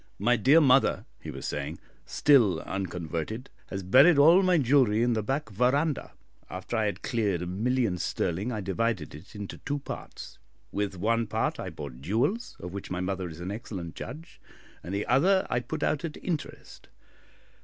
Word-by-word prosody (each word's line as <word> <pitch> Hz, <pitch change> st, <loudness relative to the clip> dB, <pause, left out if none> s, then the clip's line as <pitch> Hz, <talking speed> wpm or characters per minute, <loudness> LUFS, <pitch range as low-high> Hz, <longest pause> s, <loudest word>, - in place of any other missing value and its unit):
"My 120 Hz, +5 st, +3 dB
dear 135 Hz, +8 st, +5 dB
mother," 135 Hz, -3 st, +4 dB, 0.2 s
he -, -, -7 dB
was -, -, -7 dB
saying, -, -, -3 dB, 0.3 s
"still 115 Hz, -, +4 dB
unconverted, 90 Hz, -, -4 dB, 0.2 s
has 95 Hz, -1 st, -5 dB
buried 135 Hz, -, +6 dB
all 165 Hz, +6 st, +7 dB
my 185 Hz, -2 st, +3 dB
jewellery 125 Hz, -5 st, +3 dB
in 120 Hz, 0 st, +2 dB
the 110 Hz, -, 0 dB
back 135 Hz, +1 st, -2 dB
verandah. 135 Hz, -, +1 dB, 0.4 s
After 95 Hz, +5 st, -5 dB
I 110 Hz, -1 st, +1 dB
had 105 Hz, -, -3 dB
cleared 100 Hz, -7 st, 0 dB
a -, -, -3 dB
million 110 Hz, +1 st, 0 dB
sterling, 95 Hz, +8 st, -1 dB
I 110 Hz, -3 st, -3 dB
divided 95 Hz, -3 st, -1 dB
it 75 Hz, +9 st, -13 dB
into 105 Hz, -1 st, -7 dB
two 145 Hz, +1 st, -3 dB
parts; 140 Hz, -, -8 dB, 0.3 s
with 100 Hz, -2 st, -2 dB
one 115 Hz, +4 st, +1 dB
part -, -, -1 dB
I -, -, -4 dB
bought 70 Hz, -4 st, -8 dB
jewels, 120 Hz, -, -1 dB
of 90 Hz, 0 st, -7 dB
which 100 Hz, -, -6 dB
my 90 Hz, -, -3 dB
mother 95 Hz, -1 st, -2 dB
is 80 Hz, +1 st, -10 dB
an 90 Hz, +2 st, -4 dB
excellent 100 Hz, -6 st, -6 dB
judge, 155 Hz, +7 st, -9 dB, 0.4 s
and 90 Hz, -, -7 dB
the 100 Hz, -, -1 dB
other 185 Hz, -, +3 dB
I -, -, +2 dB
put 155 Hz, +5 st, -5 dB
out 150 Hz, -, 0 dB
at 160 Hz, -3 st, -5 dB
interest. 165 Hz, -5 st, -5 dB
110 Hz, 175 wpm, -28 LUFS, 95-135 Hz, 0.4 s, all